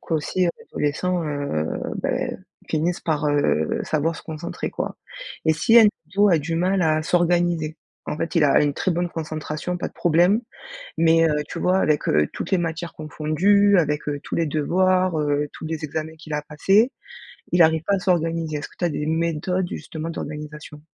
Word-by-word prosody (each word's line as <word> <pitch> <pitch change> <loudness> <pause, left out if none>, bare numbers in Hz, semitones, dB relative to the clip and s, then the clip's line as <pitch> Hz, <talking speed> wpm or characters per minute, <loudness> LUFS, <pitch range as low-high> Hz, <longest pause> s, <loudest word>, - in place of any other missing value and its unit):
qu'aussi 165 +3 -1
l'adolescent, 175 +4 -2
heu, 140 - -2 0.4
beh, - - -1 0.3
finisse 165 +3 0
par, 155 -2 -1
heu, 145 - +1
savoir 160 +2 0
se - - -10
concentrer 160 +1 -5
quoi. - - -4 0.5
Et 160 - +4
si 225 +9 +5
un 220 - +8 0.2
ado 200 +2 +4
a 170 - +4
du 165 +2 -3
mal 185 +2 +1
à 155 -1 +2
s'organiser, 175 -3 +1 0.3
en 150 - -3
fait 165 +3 -3
il 165 - +4
a 140 - +5
une 145 -1 +1
très 190 - -1
bonne 175 0 0
concentration, 155 +1 -4
pas - - -2
de - - -26
problème 175 +6 +3 0.6
mais 165 0 +4
heu, 150 -1 0
tu - - -6
vois 185 +1 +2
avec, 155 -5 +1
heu, 75 -1 +3
toutes - - -6
les 190 - +4
matières 165 0 -3
confondues, 180 +7 +2
avec, 150 -2 0
heu, 145 -1 -3
tous - - -4
les 165 - +1
devoirs, 180 +3 +1
heu, 145 0 0
tous - - -7
les 160 -1 -4
examens 155 +2 -4
qu'il 155 -1 -7
a - - +1
à 150 - -5
passer, 195 - +2 0.6
il 175 -1 +5
arrive 160 0 +3
pas 200 - +2
à - - -1
s'organiser. 165 -4 0
Est-ce 145 - -6
que - - -22
tu 175 - -1
as - - +3
des 150 0 -3
méthodes 170 +3 0
justement 160 +1 -6
d'organisation? 150 -1 -7
160 Hz, 190 wpm, -23 LUFS, 150-175 Hz, 0.6 s, un